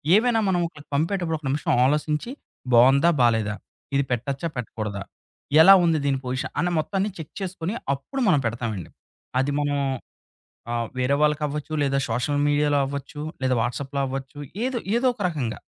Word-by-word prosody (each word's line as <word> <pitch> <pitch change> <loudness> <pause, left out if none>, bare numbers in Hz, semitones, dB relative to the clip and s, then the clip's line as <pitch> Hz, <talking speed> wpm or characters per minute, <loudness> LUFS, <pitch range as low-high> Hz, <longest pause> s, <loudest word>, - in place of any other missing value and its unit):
ఏవైనా 225 +1 +3
మనం 180 -2 +2
ఒకళ్ళకి 145 -3 -15
పంపేటప్పుడు 165 +1 0
ఒక 150 - -12
నిమిషం 145 +2 0
ఆలోసించి 150 - 0 0.4
బావుందా? 135 +7 +6
బాలేదా? 110 -3 +2 0.4
ఇది 140 - +3
పెట్టొచ్చా? 135 +6 -2
పెట్టకూడదా? 105 -4 -4 0.6
ఎలా 195 +4 +10
ఉంది 165 -1 +3
దీని 135 -1 +2
పొజిషన్ 130 +1 -3
అనే 175 0 +1
మొత్తాన్ని 195 +5 -1
చెక్ 160 -3 -9
చేసుకొని 185 0 -3 0.2
అప్పుడు 140 - -5
మనం 160 -6 +5
పెడతామండి. 110 -6 -4 0.5
అది 140 - -1
మనం 145 0 0 0.9
ఆహ్, 120 -1 -1
వేరే 130 +2 +2
వాళ్ళకవ్వచ్చు 150 0 0
లేదా 135 0 +1
సోషల్ 125 +6 0
మీడియాలో 145 0 +2
అవ్వచ్చు 140 +2 -6 0.2
లేదా 130 -1 +2
వాట్సాప్‌లో 135 +4 -3
అవ్వచ్చు 135 +2 -6 0.3
ఏదో 255 -1 -1 0.2
ఏదో 250 +2 +2
ఒక 230 - -11
రకంగా. 135 -9 -3
145 Hz, 150 wpm, -24 LUFS, 130-165 Hz, 0.9 s, ఎలా